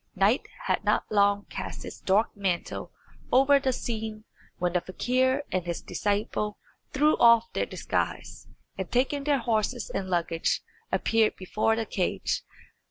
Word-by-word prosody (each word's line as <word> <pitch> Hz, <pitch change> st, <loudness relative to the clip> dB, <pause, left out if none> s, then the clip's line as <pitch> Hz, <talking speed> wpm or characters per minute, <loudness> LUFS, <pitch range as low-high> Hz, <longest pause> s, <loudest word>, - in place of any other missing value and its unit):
Night 200 Hz, +7 st, +2 dB, 0.2 s
had -, -, 0 dB
not -, -, +2 dB
long 205 Hz, -1 st, +3 dB
cast -, -, -6 dB
its -, -, -8 dB
dark 205 Hz, +5 st, +2 dB
mantle 190 Hz, -4 st, -2 dB, 0.4 s
over 275 Hz, +2 st, +6 dB
the 265 Hz, -1 st, +1 dB
scene 220 Hz, -3 st, -4 dB, 0.3 s
when 175 Hz, -1 st, 0 dB
the 180 Hz, -, +2 dB
fakir 260 Hz, +8 st, +1 dB
and 180 Hz, -2 st, -1 dB
his 170 Hz, -, -2 dB
disciple 210 Hz, 0 st, -2 dB, 0.3 s
threw 300 Hz, +3 st, +3 dB
off 235 Hz, -1 st, +5 dB
their -, -, -1 dB
disguise, -, -, -3 dB, 0.3 s
and -, -, -4 dB
taking 275 Hz, +3 st, +1 dB
their 290 Hz, -2 st, +3 dB
horses 230 Hz, 0 st, -1 dB
and 190 Hz, -1 st, -3 dB
luggage, 170 Hz, -2 st, 0 dB, 0.3 s
appeared 225 Hz, -1 st, +2 dB
before 215 Hz, +4 st, 0 dB
the 225 Hz, 0 st, -2 dB
cage. 185 Hz, -3 st, -1 dB
220 Hz, 145 wpm, -27 LUFS, 195-250 Hz, 0.4 s, over